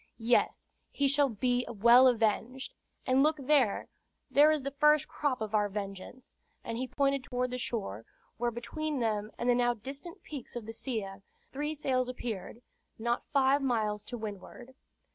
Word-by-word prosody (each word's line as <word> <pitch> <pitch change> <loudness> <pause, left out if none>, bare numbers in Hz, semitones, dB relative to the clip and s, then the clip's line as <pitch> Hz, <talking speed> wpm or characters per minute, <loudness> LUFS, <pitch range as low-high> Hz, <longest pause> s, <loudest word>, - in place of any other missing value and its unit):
"Yes, 235 +1 +1 0.2
he 280 - +1
shall 280 0 +3
be 245 +2 0
well 235 +4 +6
avenged. 240 +2 0 0.3
And 260 +1 +3
look 310 +2 +3
there! 275 -6 +2 0.4
There 295 +2 +6
is 305 -3 +1
the 275 - -3
first 300 +1 +4
crop 280 -5 -2
of 215 -1 -4
our 210 -1 +2
vengeance." 200 +4 -7 0.3
And 230 0 -4
he 260 - -2
pointed 275 0 0
toward 250 -1 -2
the 250 - -3
shore, 195 - -4 0.3
where 240 +1 0
between 280 +6 -4
them 215 -3 -1
and 240 - -2
the 245 - +5
now 240 0 +2
distant 275 - -9
peaks 280 -6 -8
of 240 -3 -5
the 225 - -7
Silla 210 -6 -4 0.3
three 295 +3 -3
sails 255 -3 0
appeared, 235 -2 -6 0.3
not 235 +2 -2
five 275 0 +3
miles 215 -5 0
to 245 - -5
windward. 220 +4 -8
245 Hz, 165 wpm, -31 LUFS, 225-275 Hz, 0.4 s, well